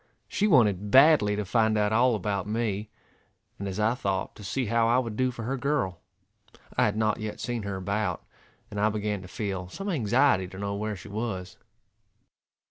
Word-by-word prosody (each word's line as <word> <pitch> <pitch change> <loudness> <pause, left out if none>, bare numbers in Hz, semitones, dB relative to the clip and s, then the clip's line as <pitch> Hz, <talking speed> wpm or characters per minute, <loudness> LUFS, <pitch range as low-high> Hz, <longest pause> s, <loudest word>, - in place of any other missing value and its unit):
She 210 - +1
wanted 105 - +3
badly 135 -5 +6
to 105 0 -2
find 110 +1 +2
out 105 0 +1
all 120 +1 +4
about 100 -1 -2
me, 105 -2 -2 0.7
and 100 - -4
as 95 +1 -4
I 110 +2 +3
thought 95 -6 -2
to 105 - -11
see 130 +6 -2
how 115 +1 +2
I 120 +2 +4
would 115 -4 -1
do 130 +2 +1
for 120 -2 -6
her 135 +4 -2
girl. 125 - -1 0.8
I - - +4
had 105 0 0
not 110 0 +1
yet 110 -1 -5
seen 120 -2 -3
her 100 -1 -4
about, 95 -1 -2 0.5
and 105 - -4
I 105 +1 +3
began 105 -2 -2
to 90 - -10
feel 95 -2 -4
some 195 - -5
anxiety 125 - +2
to 95 - -11
know 100 0 -3
where 105 +1 -3
she 90 - -11
was. 100 -3 -4
105 Hz, 195 wpm, -27 LUFS, 100-120 Hz, 0.8 s, badly